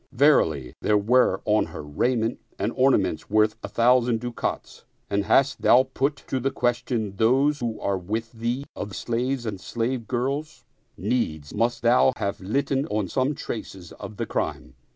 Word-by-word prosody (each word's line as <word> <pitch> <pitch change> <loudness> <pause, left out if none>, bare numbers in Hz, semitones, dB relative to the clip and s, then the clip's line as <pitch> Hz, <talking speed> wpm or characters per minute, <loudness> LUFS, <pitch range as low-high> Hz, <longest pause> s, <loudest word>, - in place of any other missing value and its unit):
Verily, 80 - +3
there 105 - +3
were 105 -2 +3
on 105 -3 +2
her 80 -1 -8
raiment 115 +10 0 0.2
and - - -1
orna 135 +1 +5
ments 95 -5 -3
worth 110 +1 +3
a - - -5
thousand 120 -1 +3
ducats, 120 0 -4 0.3
and 100 0 +1
hadst 135 +5 +3
thou 125 +2 +6
put 140 +2 +1
to 130 - -2
the 135 +2 0
question 120 -5 -1
those 135 +7 +3
who 115 -4 -3
are 100 -2 -1
with 110 +5 -4
thee 120 +4 -3
of 100 -1 -6
slaves 120 +2 -2
and 100 -4 -4
slave 115 +2 -2
girls, 135 +2 -3 0.3
needs 80 - -2
must 120 +2 0
thou 125 +2 +5
have 100 0 -3
litten 135 +7 0
on 105 -6 -1
some 130 +9 0
traces 95 -9 -7
of 105 - -9
the - - -2
crime. 65 - -3
115 Hz, 165 wpm, -25 LUFS, 105-130 Hz, 0.3 s, thou